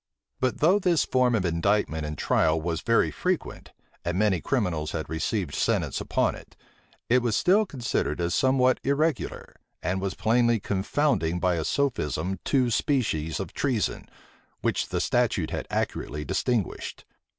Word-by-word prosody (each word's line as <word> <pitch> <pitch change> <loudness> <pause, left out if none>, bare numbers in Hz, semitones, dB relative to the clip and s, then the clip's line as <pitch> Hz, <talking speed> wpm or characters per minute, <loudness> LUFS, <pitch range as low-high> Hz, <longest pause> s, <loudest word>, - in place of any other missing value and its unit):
But 130 -1 -1
though 180 +7 +5
this 175 -5 +2
form 125 -2 +2
of 100 -4 0
indictment 85 -2 0
and 75 -1 -5
trial 80 +4 +2
was 80 0 -2
very 115 -1 +2
frequent, 180 -1 -3 0.3
and 90 +1 -2
many 100 -5 +2
criminals 90 - -1
had 80 -2 -3
received 80 +1 -2
sentence - - 0
upon - - +1
it, - - -13 0.5
it 125 +2 +4
was 120 -3 0
still 205 +4 +3
considered 120 - -2
as 85 0 0
somewhat 130 -1 +3
irregular, 145 +1 -1 0.3
and 95 +1 -1
was 95 -1 -2
plainly 115 +2 +2
confounding 95 - 0
by 90 0 +2
a 80 -2 -1
sophism 95 - -1
two 130 -4 +2
species 105 - 0
of 95 - -5
treason, 125 -8 -1 0.5
which - - 0
the - - -1
statute - - +1
had - - -4
accurately 75 +1 -3
distinguished. 120 -6 -2
105 Hz, 150 wpm, -26 LUFS, 85-130 Hz, 0.5 s, though